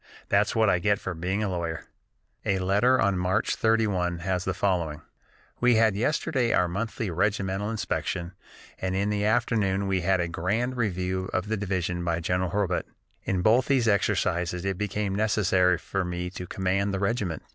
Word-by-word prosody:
That's 100 +2 +2
what 110 -1 +4
I 90 -3 +3
get 105 +3 +2
for 95 - -4
being 95 +5 -2
a 105 - -1
lawyer." 85 -3 -3 0.6
A 95 - +1
letter 100 +8 +3
on 100 -2 +2
March 95 +3 +1
31 100 -6 +1
has 90 -2 -1
the 95 - 0
following: 85 -6 -1 0.6
"We 125 -1 +4
had 110 -2 +4
yesterday 130 +1 0
our 90 - +3
monthly 105 +2 -3
regimental 95 +2 0
inspection 90 -5 -2 0.5
and 95 0 -2
in 100 +2 0
the 105 0 0
afternoon 100 -2 +1
we 95 -1 0
had 95 +1 +2
a 85 - 0
grand 110 +10 -1
review 95 -4 -1
of 95 +3 -1
the 110 - +1
division 90 -3 -2
by 85 -1 0
General 90 +2 0
Hurlbut. 100 -1 -1 0.4
In 95 -2 0
both 120 +4 +4
these 130 -4 +2
exercises 90 -3 +1
it 95 -2 -2
became 105 -1 -2
necessary 95 -4 +2
for 95 +3 -3
me 90 0 -4
to 90 -1 -7
command 100 +2 0
the - - -2
regiment. 100 - -1
95 Hz, 175 wpm, -26 LUFS, 90-105 Hz, 0.6 s, what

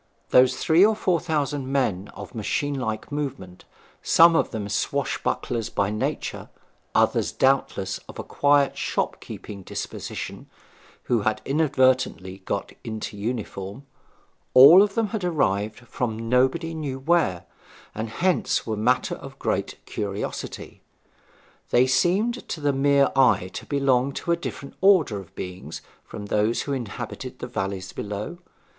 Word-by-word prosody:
Those 125 0 +5
three 165 +3 +4
or 215 +1 +5
four 185 -5 +1
thousand 145 -4 -2
men 105 -9 0
of - - -8
one - - -10
machine 145 +7 -1
like 110 +2 -4
movement, 135 -11 -5 0.4
some 165 0 +6
of - - +2
them 105 -3 -4
swashbucklers 110 +2 -1
by 100 0 0
nature; 105 - -3 0.5
others, - - +2
doubtless, 100 -8 +1
of - - -10
a - - -4
quiet 145 -1 +2
shop - - -2
keeping 100 -2 -8
disposition - - -6 0.5
who 120 -3 +1
had 110 +1 0
inadvertently 130 - +1
got 100 - -3
into 110 -2 -5
uniform 105 +1 -5 0.7
all 145 +9 +10
of 205 -1 +1
them 225 -2 +1
had 220 -3 -3
arrived 110 - 0
from 115 -2 -4
nobody 130 +7 +2
knew 145 -5 -4
where, 135 - +1 0.5
and 110 +1 -4
hence 175 +4 0
were 110 - -2
matter 120 +4 +1
of - - -9
great - - -2
curiosity. 100 0 -5 0.9
They 125 +1 +4
seemed 195 - +1
to 165 - -3
the 145 -1 +1
mere 140 0 +3
eye 100 -8 +3
to - - -7
belong 135 -1 +2
to 170 - -3
a - - +4
different 155 -4 -7
order 180 - +4
of 95 - -13
beings 90 0 -7 0.2
from 105 - -8
those 105 +3 +1
who 140 - -3
inhabited 125 -6 -6
the - - -6
valleys 95 -1 -4
below. 105 +11 -5
130 Hz, 140 wpm, -24 LUFS, 105-150 Hz, 0.9 s, all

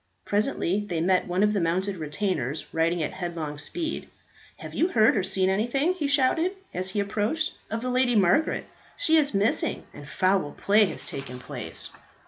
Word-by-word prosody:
Presently 205 -2 0
they 170 -3 -1
met 185 +2 +2
one 180 +3 +1
of 210 0 +3
the 205 - +1
mounted 185 +4 0
retainers 155 - -2
riding 165 +1 +1
at - - -2
headlong 165 -5 -5
speed. 325 - -4 0.5
"Have - - -9
you 340 - +2
heard 220 -10 +4
or 200 - +2
seen 190 0 +1
anything," 240 - +1
he 320 -6 -2
shouted, 290 +6 +2 0.2
as 185 +1 -1
he 205 - -1
approached, 210 +10 -1 0.2
"of 225 +2 -3
the 255 - -1
Lady 250 -1 +2
Margaret? 200 - +3 0.3
She 320 -10 +3
is 285 -7 +2
missing, 200 +3 +1
and 145 0 -11
foul 185 -5 +1
play 210 +1 +4
has 185 - -5
taken 130 -2 -6
place." 125 - -2
200 Hz, 175 wpm, -26 LUFS, 175-255 Hz, 0.5 s, heard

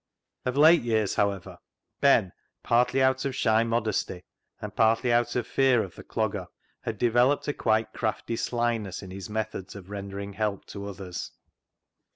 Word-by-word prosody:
Of 125 +1 -1
late 160 +3 +7
years, 110 -4 +1
however, 100 -3 -1 0.4
Ben, 115 -9 +4 0.3
partly 125 +3 +3
out 130 0 +2
of 135 -2 -2
shy 110 -2 +3
modesty, 110 -5 -1 0.4
and - - -7
partly 115 +2 +3
out 120 0 +2
of 125 - 0
fear 130 -4 +3
of 95 - -9
the - - -11
Clogger, - - -2 0.3
had 110 - -4
developed 120 +5 +3
a 145 - 0
quite 110 -2 +1
crafty 110 +1 -2
slyness 115 -5 -1
in 95 - -9
his 95 0 -7
methods 105 -3 -4
of 100 0 -11
rendering 100 0 -6
help 105 -1 -2
to 100 -1 -6
others. 95 -2 -6
110 Hz, 160 wpm, -27 LUFS, 100-120 Hz, 0.4 s, late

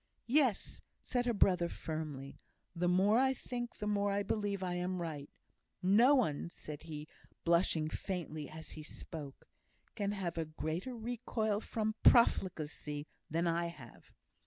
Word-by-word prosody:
"Yes!" 255 -5 +2 0.2
said 245 -1 0
her 240 - +3
brother, 180 -3 +4
firmly. 150 -5 -5 0.4
"The 175 +1 +1
more 195 +6 +5
I 265 0 +3
think, 240 -1 -5
the 210 - -4
more 205 -1 +1
I 200 +1 +1
believe 200 -1 -1
I 180 -1 -1
am 180 +1 -1
right. 155 -4 -4 0.5
No 230 +9 +6
one," 170 - +1
said 150 -3 -8
he, 155 -2 -7 0.4
blushing 170 -2 +3
faintly 155 -4 -4
as 160 0 -9
he 155 - -8
spoke, 150 -2 -8 0.5
"can 205 -2 -1
have 175 -4 -3
a 165 - 0
greater 160 - -3
recoil 220 -2 -1
from 220 0 -1
profligacy 155 -9 +3 0.2
than 165 +3 +1
I 170 0 +1
have. 140 -8 -12
180 Hz, 145 wpm, -35 LUFS, 155-215 Hz, 0.5 s, No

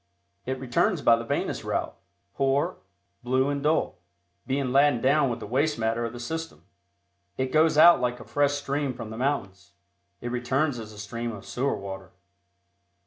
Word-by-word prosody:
It 130 0 -2
returns 140 - +1
by 115 - +6
the 115 - -4
venous 115 - -2
route, - - -2 0.4
poor, 140 +6 +1 0.4
blue 130 +2 +1
and 140 0 -2
dull, 150 - 0 0.5
being 135 -1 -1
laden 140 -1 +4
down 140 +2 +3
with 120 - -3
the - - -7
waste 140 +7 0
matter 115 +1 0
of 115 - -4
the 120 - -9
system. 160 - -5 0.7
It 130 0 -1
goes 155 0 +4
out 170 -2 +8
like 125 0 -1
a - - -9
fresh 145 0 +1
stream 145 -2 -2
from 110 - -7
the 110 - -7
mountains; 95 -9 -3 0.5
it 120 - -5
returns 125 +2 0
as 110 -1 -8
a 105 - -13
stream 115 +3 -4
of 105 -3 -9
sewer 135 +3 -1
water. 95 -2 -8
130 Hz, 175 wpm, -26 LUFS, 115-145 Hz, 0.7 s, out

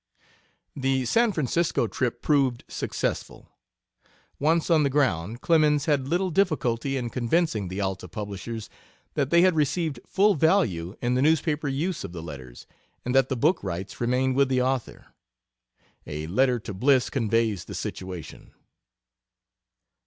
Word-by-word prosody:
The 135 -1 0
San 230 - +3
Francisco 160 -3 0
trip 120 +1 -2
proved 135 -5 +2
successful. - - -4 0.9
Once 165 +3 +2
on 160 -2 +5
the 140 - +2
ground 115 - 0
Clemens 150 -3 +3
had 145 -4 +1
little 180 +4 0
difficulty 140 -8 0
in 120 -3 -3
convincing 120 - 0
the 95 +3 -4
Alta 95 -1 -3
publishers 105 +3 -6 0.5
that 140 -3 0
they 170 +2 +5
had 185 -2 +4
received 150 +1 0
full 205 +2 +3
value 140 - +1
in 120 +1 +1
the 130 - +1
newspaper 155 0 +1
use 150 +6 -2
of 85 - -7
the 85 -2 -7
letters, 65 -6 -10 0.4
and 125 - -1
that 135 -1 +4
the 130 - -1
book 155 +10 +2
rights 95 +7 -5
remained 125 +2 +1
with 140 0 +3
the 130 -1 +2
author. 130 -1 -2 0.9
A 75 +1 -4
letter 125 +9 +2
to 110 -2 -7
Bliss 130 +5 +2
conveys 115 - 0
the - - -8
situation. 90 -3 -7
130 Hz, 145 wpm, -26 LUFS, 110-155 Hz, 0.9 s, on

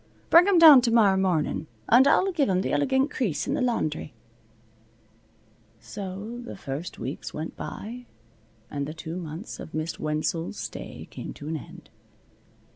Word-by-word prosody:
Bring 345 +3 +8
'em 395 -3 +4
down 310 -6 +10
tomorrow 230 -5 +4
mornin' 175 -5 0 0.2
and 255 +4 +6
I'll 385 +6 +4
give 305 - +1
'em 185 0 +1
th' - - -2
elegant 270 0 +2
crease 200 - -1
in - - -1
the - - -1
laundry." 155 - -1 1.6
So 205 - -7
the 240 - -8
first 155 -1 -6
weeks 130 +5 -6
went 155 +2 -5
by, 240 +3 -7 0.6
and 140 -1 -3
the 155 - -7
two 165 +1 -6
months 165 +3 -7
of 160 - -9
Miss 155 +1 -3
Wenzel's 155 +3 -2
stay - - -7
came - - -7
to 145 - -9
an 160 - -2
end. 145 - -13
190 Hz, 155 wpm, -26 LUFS, 155-250 Hz, 1.6 s, down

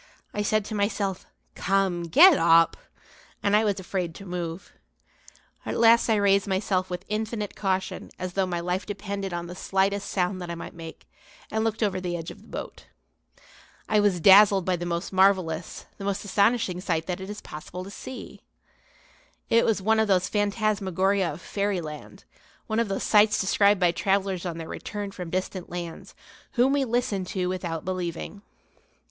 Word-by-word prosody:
I 210 - -1
said 215 0 +1
to 215 - -6
myself: 200 -2 -1 0.3
"Come, 190 -3 0
get 330 - +8
up!" 165 -5 +5 0.7
and 200 0 +3
I 215 - +4
was 205 -3 0
afraid 180 -3 -3
to 195 - -10
move. 175 -1 -5 0.9
At - - -3
last 230 +1 +5
I 220 - +4
raised 200 -1 +3
myself 190 -1 0
with 180 +1 -5
infinite 215 0 -3
caution 190 -2 -2
as 185 -1 -5
though 195 -1 +1
my 175 -1 -2
life 180 +2 -2
depended 200 -1 -4
on 175 0 -4
the 175 - -8
slightest 195 +2 0
sound 185 0 -1
that 175 - -6
I 170 - -3
might 170 - -8
make; 165 -1 -10 0.4
and 220 0 0
looked 225 0 -1
over 190 -3 0
the 175 -1 -2
edge 165 -1 -6
of - - -13
the - - -19
boat. - - -8 1.0
I 215 - +3
was 205 -4 +2
dazzled 195 +1 +7
by 185 - +1
the 175 0 -4
most 170 +3 -3
marvellous, 185 -4 +1
the 195 - -6
most 200 +1 -2
astonishing 200 -2 +1
sight 165 -4 -1
that 180 0 -4
it 190 - -7
is 210 0 -6
possible 155 +4 -8
to 195 - -9
see. 260 +4 -9 1.1
It 230 0 +5
was 210 -4 +1
one 220 +2 +3
of 220 - +2
those 185 -2 +2
phantasmagoria 200 -3 0
of 150 +4 -9
fairyland, 175 -5 -4 0.4
one 220 0 -1
of 230 - +1
those 195 - -2
sights 215 0 +4
described 200 +1 +3
by 175 -2 +4
travellers 190 0 0
on 165 -2 -4
their 165 -1 -6
return 205 -1 -5
from 180 -3 -7
distant 185 0 -3
lands, 175 -2 -7 0.4
whom 255 +2 +3
we 280 -1 +2
listen 235 -5 -1
to 185 -1 -2
without 175 -3 -3
believing. 185 +2 -4
195 Hz, 175 wpm, -26 LUFS, 180-205 Hz, 1.1 s, get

